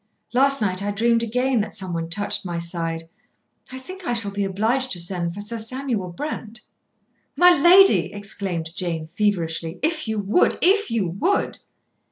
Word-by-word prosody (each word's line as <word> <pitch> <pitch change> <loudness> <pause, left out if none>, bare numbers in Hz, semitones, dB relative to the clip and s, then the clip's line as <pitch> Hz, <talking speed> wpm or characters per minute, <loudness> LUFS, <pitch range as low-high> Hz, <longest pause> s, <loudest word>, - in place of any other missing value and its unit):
Last 275 +1 +4
night 185 -2 0
I 205 - -2
dreamed 230 +3 +2
again 250 +1 0
that 210 - -5
someone 170 -3 -4
touched 205 +4 -1
my 175 -2 -4
side. 165 -1 -4 0.6
I 260 - -7
think 370 +9 -10
I 245 - -1
shall 225 -4 0
be 200 0 -2
obliged 225 +7 0
to 180 - -4
send 170 -1 -2
for 205 - -6
Sir 225 +3 -5
Samuel 230 -4 -3
Brent." 230 - -6 0.7
"My 355 0 +7
lady," 355 +4 +6
exclaimed 195 -5 -4
Jane 170 -4 -3
feverishly, 165 -3 -2
"if 310 -3 0
you 220 0 -2
would 205 - +2
if 405 +3 +4
you 220 -5 0
would." 210 - -1
205 Hz, 165 wpm, -22 LUFS, 180-255 Hz, 0.7 s, My